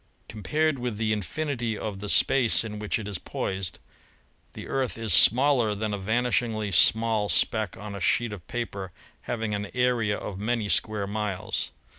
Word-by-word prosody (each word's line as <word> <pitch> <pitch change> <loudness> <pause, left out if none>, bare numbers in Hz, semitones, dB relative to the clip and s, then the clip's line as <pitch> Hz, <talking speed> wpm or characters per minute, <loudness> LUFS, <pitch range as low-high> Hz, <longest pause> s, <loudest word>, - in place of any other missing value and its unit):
Compared 150 +7 0
with 120 -3 -3
the 110 0 +1
infinity 120 - -2
of 105 -3 -5
the 105 0 -5
space 125 0 +4
in 105 -2 -6
which 105 +3 -1
it 110 -3 -6
is 100 -4 -4
poised, 95 -3 -3 0.8
the - - -8
Earth 130 -4 -1
is 110 -5 -2
smaller 125 - +5
than 105 0 -2
a 100 - -2
vanishingly 110 0 0
small 110 +2 +3
speck 110 -2 +1
on 105 -1 -7
a 100 - -6
sheet 120 +4 +1
of 95 -5 -10
paper 100 -6 -4 0.4
having 115 -3 -2
an 100 -1 -3
area 120 -4 +1
of 95 -2 -6
many 110 0 -1
square 105 -1 +1
miles. 100 -2 -2
110 Hz, 165 wpm, -26 LUFS, 105-120 Hz, 0.8 s, smaller